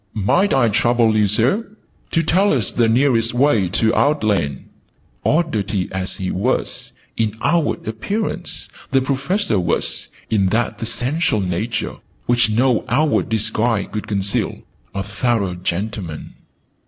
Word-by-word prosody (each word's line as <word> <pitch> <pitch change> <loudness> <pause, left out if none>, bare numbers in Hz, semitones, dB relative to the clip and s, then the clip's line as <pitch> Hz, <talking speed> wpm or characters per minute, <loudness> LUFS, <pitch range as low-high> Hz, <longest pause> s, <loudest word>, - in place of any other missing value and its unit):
"Might 175 - +2
I 125 -3 +4
trouble 115 +1 +3
you, 105 -1 +3
Sir, 185 - 0 0.3
to 165 - +1
tell 190 +6 +3
us 120 -8 0
the 115 -2 +2
nearest 120 -1 +2
way 120 -8 +3
to 110 +4 +2
Outland!" 105 - +1 0.6
Oddity 110 - 0
as 95 0 -3
he 95 -1 -3
was, 110 +8 -2 0.2
in 110 -1 -1
outward 170 -9 +1
appearance, 200 - -3 0.2
the 135 - +3
Professor 140 - 0
was, 85 - -2 0.2
in 100 -3 +2
that 115 +5 -1
essential 125 +2 0
nature 95 +5 -2 0.3
which 120 -2 +3
no 120 +2 +2
outward 150 +5 +2
disguise 110 -1 0
could 105 - -4
conceal, 100 -1 -2 0.3
a 100 - -1
thorough 100 -1 0
gentleman. 90 -1 -4
115 Hz, 130 wpm, -20 LUFS, 100-135 Hz, 0.6 s, I